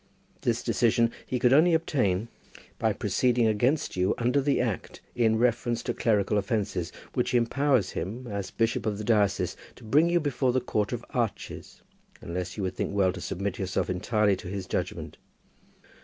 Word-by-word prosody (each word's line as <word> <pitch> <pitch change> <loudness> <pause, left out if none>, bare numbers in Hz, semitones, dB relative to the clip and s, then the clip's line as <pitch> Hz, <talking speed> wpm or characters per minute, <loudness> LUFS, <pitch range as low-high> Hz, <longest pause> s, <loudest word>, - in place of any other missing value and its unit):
This - - 0
decision 115 0 +2 0.2
he 130 - -1
could 125 +1 +4
only 165 +4 +6
obtain 115 - 0 0.5
by - - +2
proceeding 125 -2 +1
against 125 +8 +1
you 90 +1 +1
under 125 +4 +2
the 140 +1 +1
Act 115 -6 -3
in 110 -2 +2
reference 120 0 +1
to 120 - -2
clerical 105 -3 +1
offences, 100 -4 -2 0.2
which - - 0
empowers 120 -3 +2
him 110 +9 -5
as 100 -4 -4
bishop 115 +2 0
of 105 -2 -1
the 105 - -5
diocese 105 -3 +1 0.2
to - - -16
bring 150 +10 +3
you 175 0 +3
before 135 -4 0
the 130 - +3
Court 105 -4 -1
of 120 -1 -4
Arches, 120 -4 -4 0.4
unless 90 +2 -5
you 100 - -2
would 95 -1 -2
think - - -2
well 95 -2 +3
to - - -7
submit 100 0 -3
yourself 95 -1 -1
entirely 105 +2 +1
to 95 - -9
his 95 0 -4
judgment. - - -4
115 Hz, 170 wpm, -27 LUFS, 100-125 Hz, 0.5 s, only